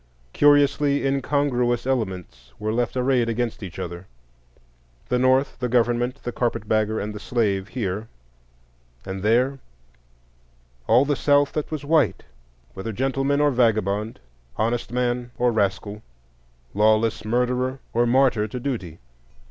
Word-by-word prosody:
Curiously 145 -1 +3
incongruous 135 -3 0
elements 105 -9 -3
were 110 +1 -2
left 120 +2 -1
arrayed 125 -2 +2
against 115 0 -2
each 90 -4 -8
other,—the - - -8
North, 130 +2 +2
the 125 - -2
government, 120 +2 0
the 120 - -3
carpet 115 -4 -2
bagger, 110 0 +1
and 105 +1 -4
the 105 - -7
slave, 100 -5 -1
here; 105 -3 -4 1.0
and 95 0 -5
there, 125 +6 +2 1.3
all 120 +5 +5
the 145 0 +1
South 145 0 +3
that 150 - -3
was 150 -2 -5
white, 155 0 +2 0.5
whether 95 +4 -5
gentleman 135 +4 0
or 145 0 +3
vagabond, 110 -3 0 0.4
honest 115 +3 -1
man 120 0 -1
or 125 0 +2
rascal, 105 0 -1 0.7
lawless 110 +2 +2
murderer 125 +3 0 0.2
or 120 +1 +2
martyr 125 -4 +3
to 125 +4 -6
duty. 110 - -4
120 Hz, 125 wpm, -23 LUFS, 105-130 Hz, 1.3 s, all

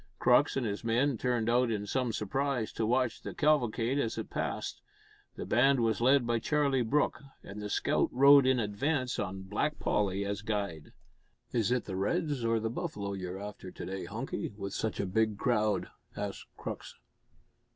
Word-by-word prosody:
Crux 135 +3 +4
and 130 - 0
his 105 -2 -3
men 120 +4 +2
turned 120 -1 0
out 120 +1 +3
in 105 -2 -2
some 125 +2 0
surprise 125 +3 -1
to 110 - -1
watch 125 0 +1
the - - -7
cavalcade 135 -4 +2
as 115 -5 -1
it - - -5
passed. - - -3 0.5
The - - -5
band 135 +3 +4
was 115 -1 +1
led 130 +1 +4
by 120 -1 +1
Charlie 140 0 +1
Brooke, 135 +6 +1 0.2
and 100 +2 -8
the 105 - -4
scout - - +1
rode 140 +1 +7
in 130 -1 +3
advance 125 +5 -1
on 95 -1 -3
Black 105 +11 -1
Polly 100 -1 0
as 100 0 -3
guide. 100 -8 -3 0.6
"Is 115 -1 +1
it 125 -1 +1
the 95 - -5
Reds 145 - -1
or 115 0 +2
the 110 0 -2
Buffalo 105 - -4
you're 95 -1 -5
after 100 -2 -7
to - - -8
day, 95 -1 -5
Hunky, 110 +1 -4
with 100 -1 -5
such 110 - -2
a - - 0
big 110 +2 +1
crowd?" 110 -3 +1 0.3
asked 100 -1 -5
Crux. - - -6
115 Hz, 180 wpm, -31 LUFS, 100-130 Hz, 0.6 s, rode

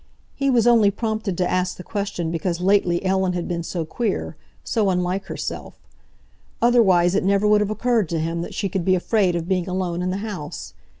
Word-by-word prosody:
He 275 0 0
was 240 -4 +3
only 230 -4 +5
prompted 215 -2 -3
to 180 - +1
ask 180 0 -1
the 180 - -8
question 200 -6 -3
because 170 +1 -2
lately 185 -1 +2
Ellen 190 -1 +1
had 175 -1 -3
been 170 -1 -2
so 170 0 -4
queer, 215 +5 -3 0.3
so 215 -4 +1
unlike 180 +1 -1
herself. - - -6 0.8
Otherwise 190 -8 +4
it 195 - +1
never 200 +2 +2
would 210 0 +4
have 210 - 0
occurred 225 -4 0
to 165 - -1
him 165 +1 -2
that 170 - -7
she 200 - -1
could 190 -1 -2
be 185 +1 +3
afraid 185 -1 +1
of 170 -1 -3
being 185 -1 0
alone 180 -2 -2
in 180 - -1
the 185 - -2
house. 180 -9 -7
185 Hz, 200 wpm, -22 LUFS, 175-210 Hz, 0.8 s, only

